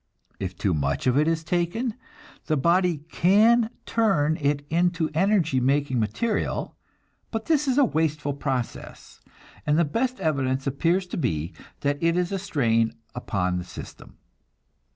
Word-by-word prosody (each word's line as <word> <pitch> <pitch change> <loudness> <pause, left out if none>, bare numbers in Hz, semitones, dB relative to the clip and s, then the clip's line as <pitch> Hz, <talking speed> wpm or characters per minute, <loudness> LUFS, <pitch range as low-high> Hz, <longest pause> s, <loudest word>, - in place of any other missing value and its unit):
If 95 -2 -4
too 95 - 0
much 70 -2 -1
of 125 -1 +3
it 150 +2 +3
is 165 -1 0
taken, 175 +9 -1 0.5
the 155 - +1
body 170 +1 +2
can 220 +6 +4 0.2
turn 170 -10 +2
it 145 0 0
into 170 0 +1
energy 170 -5 +2
making 135 0 +1
material, 115 - -1 0.5
but 225 -1 -4
this 300 -3 +2
is 260 0 +1
a 285 - +6
wasteful 150 - -1
process, 135 -4 -5 0.4
and 150 0 +2
the 170 - +4
best 250 - -1
evidence 135 -3 0
appears 165 +7 +1
to 180 - -6
be 85 - -2 0.3
that 145 0 -1
it 165 +1 +2
is 180 0 0
a 195 - -1
strain 115 - +1 0.2
upon 90 -7 -1
the - - -5
system. - - -11
155 Hz, 150 wpm, -25 LUFS, 130-185 Hz, 0.5 s, a